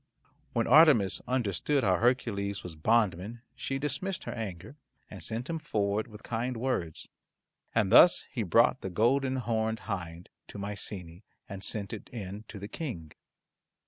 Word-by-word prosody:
When 115 Hz, -1 st, +1 dB
Artemis 130 Hz, -, +6 dB
understood 125 Hz, -, 0 dB
how 95 Hz, -3 st, +3 dB
Hercules 100 Hz, -4 st, 0 dB
was 90 Hz, -, -7 dB
bond 105 Hz, +4 st, +2 dB
man 110 Hz, +7 st, -9 dB
she 130 Hz, +1 st, -3 dB
dismissed 150 Hz, +7 st, -2 dB
her -, -, -5 dB
anger, 105 Hz, -, -6 dB, 0.4 s
and -, -, -9 dB
sent 115 Hz, +3 st, -3 dB
him 165 Hz, -1 st, -3 dB
forward 105 Hz, -7 st, -1 dB
with 110 Hz, -2 st, -13 dB
kind 120 Hz, +2 st, -2 dB
words, 115 Hz, -10 st, -2 dB, 0.7 s
and 105 Hz, -4 st, +2 dB
thus 175 Hz, +8 st, +7 dB
he 125 Hz, -, -2 dB
brought 115 Hz, +6 st, +3 dB
the 95 Hz, -, -4 dB
golden 130 Hz, +7 st, +2 dB
horned 110 Hz, -2 st, -1 dB
hind 85 Hz, -5 st, -6 dB, 0.2 s
to -, -, -10 dB
Mycenae 100 Hz, -4 st, -5 dB, 0.3 s
and 95 Hz, 0 st, -7 dB
sent 100 Hz, -3 st, -2 dB
it -, -, -8 dB
in 105 Hz, -2 st, -7 dB
to 110 Hz, -, -9 dB
the 100 Hz, +1 st, -7 dB
King. 105 Hz, -, -6 dB
110 Hz, 155 wpm, -29 LUFS, 100-125 Hz, 0.7 s, thus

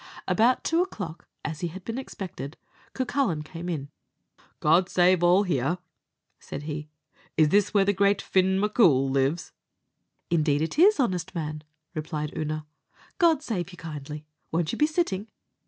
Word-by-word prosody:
About 240 Hz, +4 st, +3 dB
two 330 Hz, +1 st, +2 dB
o'clock, 180 Hz, -, -5 dB, 0.2 s
as 155 Hz, 0 st, -3 dB
he 175 Hz, -, -1 dB
had 180 Hz, +2 st, -9 dB
been 230 Hz, +3 st, -3 dB
expected, 175 Hz, -, -7 dB, 0.4 s
Cucullin 255 Hz, -, 0 dB
came 170 Hz, +3 st, -7 dB
in. 145 Hz, -5 st, -3 dB, 0.7 s
"God 175 Hz, +4 st, +4 dB
save 180 Hz, 0 st, +4 dB
all 180 Hz, +3 st, +5 dB
here!" 160 Hz, -2 st, 0 dB, 0.6 s
said 145 Hz, -, -7 dB
he; 150 Hz, 0 st, -5 dB, 0.5 s
"is 155 Hz, -1 st, +5 dB
this 205 Hz, +3 st, +3 dB
where 200 Hz, -2 st, +4 dB
the 205 Hz, -, +3 dB
great 200 Hz, +1 st, +3 dB
Fin 190 Hz, 0 st, +2 dB
M'Coul 175 Hz, -, +4 dB
lives?" 135 Hz, +5 st, 0 dB, 0.8 s
"Indeed 155 Hz, -3 st, +2 dB
it 165 Hz, -, -3 dB
is, 400 Hz, +1 st, +6 dB
honest 185 Hz, -7 st, 0 dB
man," 155 Hz, -2 st, -4 dB, 0.3 s
replied 155 Hz, -2 st, -4 dB
Oonagh; 155 Hz, 0 st, -3 dB, 0.5 s
"God 325 Hz, -5 st, +4 dB
save 185 Hz, -, -2 dB
you 180 Hz, -, -12 dB
kindly 150 Hz, -2 st, -7 dB, 0.3 s
won't 165 Hz, -1 st, 0 dB
you -, -, -4 dB
be 300 Hz, -, +5 dB
sitting?" 270 Hz, -, -1 dB
175 Hz, 155 wpm, -26 LUFS, 155-205 Hz, 0.8 s, is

